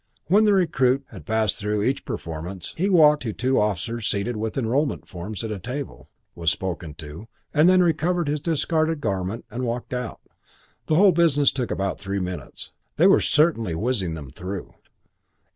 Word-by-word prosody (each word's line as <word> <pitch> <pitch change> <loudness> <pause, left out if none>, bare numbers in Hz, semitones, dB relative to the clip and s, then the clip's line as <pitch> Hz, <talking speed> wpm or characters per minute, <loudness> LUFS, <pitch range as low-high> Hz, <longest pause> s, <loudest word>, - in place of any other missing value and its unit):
When 205 +5 +4
the 210 - +5
recruit 135 -8 +2
had - - -11
passed 110 -1 +1
through 105 0 -1
each 135 +4 -1
performance 85 +3 -6
he 190 +5 0
walked 150 -5 +6
to 110 -4 -3
two 130 +4 +1
officers 105 +3 -1
seated 105 +4 -1
with 110 +2 -3
enrolment 135 +4 0
forms 95 +3 -6
at 110 - -4
a 105 - -4
table, 130 +6 -6 0.2
was 85 -1 0
spoken 85 0 -4
to, 80 +6 -9 0.3
and 155 +3 +5
then 185 0 +5
recovered 170 0 +1
his 150 +1 0
discarded 160 0 0
garment 95 -1 -3
and 125 +2 -4
walked 120 +1 -3
out. 125 -4 -4 0.7
The 155 - +2
whole 195 +3 +6
business 155 -5 +3
took 125 -3 -3
about 95 -1 -2
three 100 0 -3
minutes. 90 -1 -6 0.2
They - - +4
were - - +6
certainly 150 - +2
whizzing 100 -4 -1
them 70 -5 -8
through. 90 +5 -6
120 Hz, 175 wpm, -24 LUFS, 95-150 Hz, 0.7 s, walked